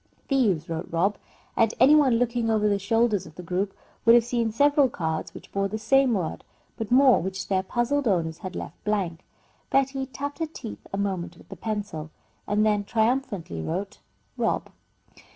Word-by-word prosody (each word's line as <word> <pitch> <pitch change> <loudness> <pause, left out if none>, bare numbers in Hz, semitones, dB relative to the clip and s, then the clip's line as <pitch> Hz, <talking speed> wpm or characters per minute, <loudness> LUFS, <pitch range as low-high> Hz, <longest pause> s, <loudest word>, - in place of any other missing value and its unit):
"Thieves" 210 - +2
wrote 165 -1 -4
Rob, 185 +5 +1 0.4
and 225 -1 +2
any 285 - +7
one 275 -6 +5
looking 240 -1 0
over 215 -1 +2
the 200 -1 +2
shoulders 225 -1 +1
of 155 - -15
the 180 - -8
group 185 +3 -1 0.3
would 230 +1 +7
have 240 - +6
seen 235 -1 -1
several 285 +3 +4
cards 160 -7 -3
which - - -12
bore 195 0 0
the 215 +2 -4
same 255 +2 +3
word, 175 -5 -3 0.3
but 220 -2 -5
more 260 0 +6
which 190 +2 -4
their 190 -1 +2
puzzled 240 +7 0
owners 165 -5 0
had 185 -1 -7
left - - -7
blank. 185 -5 -1 0.5
Betty 270 0 +1
tapped 285 +3 -6
her 325 - -1
teeth 260 -8 -9
a 195 - -3
moment 185 -4 -2
with - - -18
a - - -6
pencil 205 -8 -4 0.4
and 210 +1 +2
then 210 -1 +2
triumphantly 220 - -1
wrote 195 - -4 0.4
"rob." - - -1
210 Hz, 180 wpm, -26 LUFS, 185-245 Hz, 0.5 s, any